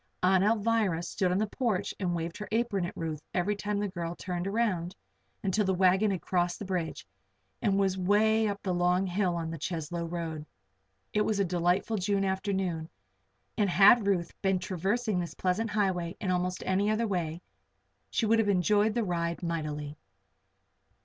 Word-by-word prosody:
Aunt 190 0 +4
Alvirah 210 -5 +2
stood 180 +1 0
on 180 - +2
the 215 - +2
porch 220 -2 -1
and 180 -3 0
waved 165 0 -3
her 210 - -5
apron 220 -5 0
at - - -10
Ruth 160 -2 -3
every 190 +4 +1
time 205 0 -2
the 205 0 0
girl 175 -3 -4
turned 180 0 -4
around, 195 -5 0 0.5
until 200 +2 +1
the 190 -1 +1
wagon 190 +3 +4
had 185 -5 -2
crossed 175 -1 0
the 205 - -6
bridge 180 -4 -3 0.6
and 200 -3 +2
was 190 -1 +1
way 215 +4 +3
up 200 -1 -4
the 185 - 0
long 180 +2 +2
hill 185 -1 0
on 165 -1 -3
the 165 - -6
Cheslow 170 +1 -3
road. 165 -3 -4 0.7
It 210 - +2
was 210 -1 +1
a 200 - +3
delightful 180 +5 +1
June 195 0 +1
afternoon 190 -4 -1 0.7
and 205 -3 +2
had 200 +5 +6
Ruth 175 -4 0
been 190 -1 +2
traversing 195 +3 -1
this 170 -1 -4
pleasant 195 +5 0
highway 190 -4 -1
in 190 - -1
almost 180 0 -1
any 195 +2 +1
other 215 +2 +1
way, 175 -4 -2 0.7
she 230 - 0
would 225 +1 +4
have 215 -2 +2
enjoyed 205 +3 +3
the 235 - +1
ride 170 -2 -2
mightily. 150 -3 -3
190 Hz, 175 wpm, -29 LUFS, 175-205 Hz, 0.7 s, had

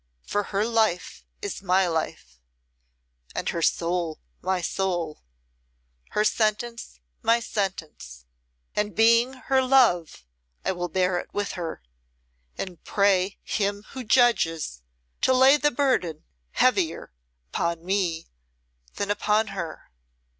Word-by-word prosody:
For 205 0 -1
her 200 +1 0
life 220 -6 0 0.2
is 405 - -4
my 190 0 +3
life, 155 - -4 1.0
and - - -3
her 170 - -2
soul 170 -1 0 0.2
my 185 0 0
soul, 175 -3 -2 0.9
her 210 - +2
sentence 230 +2 -1 0.2
my 230 +1 +3
sentence; 165 - -4 0.5
and 210 0 -1
being 230 +3 +5
her 265 0 +1
love 230 - +3 0.4
I - - +2
will 175 -1 -3
bear 180 +1 +1
it - - -9
with 205 0 -1
her, 165 - -5 0.7
and 180 -4 -6
pray 195 -1 +2
Him 205 0 -1
who 260 -2 -6
judges 165 - +2 0.4
to 260 - +4
lay 260 +2 +7
the 295 0 +2
burden 235 - 0 0.3
heavier 190 - +1 0.4
upon 170 0 -1
me 180 -4 0 0.7
than 200 0 -1
upon 210 +1 +1
her." 170 - -6
195 Hz, 120 wpm, -25 LUFS, 170-225 Hz, 1.0 s, lay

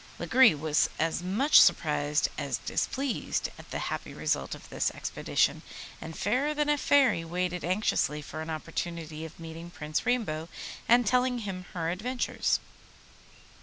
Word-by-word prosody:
Lagree 255 -8 +5
was 150 +1 +2
as 165 +1 0
much 215 +12 +5
surprised 150 -1 +3
as 140 -2 -2
displeased 270 -2 -2
at - - -13
the - - -3 0.2
happy - - -6
result - - -1
of - - -13
this - - 0
expedition, - - 0 0.4
and 160 - -7
Fairer 265 +9 +1
than 295 0 +1
a 295 - +3
Fairy 270 -14 +4
waited 180 +1 -2
anxiously 180 -5 +1
for 155 +1 -7
an 160 - -6
opportunity 160 0 -4
of 160 - -11
meeting 165 +1 -8
Prince 155 -2 -3
Rainbow 175 -10 -1 0.4
and 240 +1 +6
telling 250 +3 +2
him 185 -2 -5
her 165 -1 -1
adventures. 245 +8 0
175 Hz, 145 wpm, -29 LUFS, 160-245 Hz, 0.4 s, and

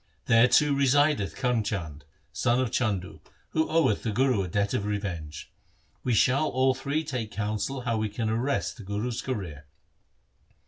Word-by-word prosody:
There 115 +2 +5
too 145 +4 +4
resideth 140 -4 +2
Karm 125 -4 0
Chand, 80 -9 -5 0.3
son 120 +1 +1
of 130 -3 0
Chandu, 95 -9 -1 0.3
who 160 0 0
oweth 160 -10 +2
the 110 - -2
Guru 125 -1 +2
a 95 - -3
debt 100 +3 -1
of - - 0
revenge. 85 -7 -5 0.5
We 125 -3 +1
shall 135 +7 +3
all 130 +1 +2
three 140 +4 -2
take 125 -8 -4
counsel 110 +6 -3
how 120 -2 -1
we 110 0 -1
can 110 +2 -3
arrest 120 +6 -1
the 110 - -10
Guru's 105 +5 -3
career.' 90 - -5
115 Hz, 165 wpm, -27 LUFS, 100-130 Hz, 0.5 s, There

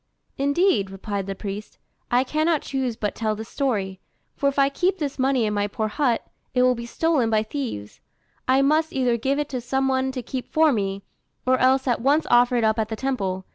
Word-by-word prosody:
"Indeed," 285 - +2
replied 195 0 -4
the 195 - -3
priest, 205 +1 -7 0.3
"I 245 +1 +3
cannot 310 +3 +1
choose 265 -4 -2
but 210 -2 -2
tell 215 -2 -1
this 220 +1 -8
story. 200 -9 -1 0.4
For 280 - +2
if 280 - -6
I 275 0 +5
keep 360 +8 0
this 285 -5 -4
money 260 -3 +2
in 210 - -1
my 205 0 0
poor 215 +1 -2
hut, 245 0 0 0.3
it 250 - +4
will 255 0 +5
be 235 -1 -6
stolen 295 -4 +1
by 215 -1 +2
thieves: 220 - -6 0.5
I 265 +1 +4
must 310 +3 +2
either 250 -3 +2
give 265 +5 0
it 295 -1 -2
to 255 -2 -3
some 265 +2 0
one 265 0 +1
to 255 -2 -4
keep 255 +2 -5
for 315 -2 +4
me, 195 -2 -2 0.4
or 255 0 +3
else 265 +1 +3
at 240 -2 +1
once 290 +5 +3
offer 245 +1 +5
it 235 - +2
up 220 +1 +2
at 220 -1 -1
the 220 - -3
temple. 195 -8 -2
250 Hz, 215 wpm, -24 LUFS, 215-275 Hz, 0.5 s, I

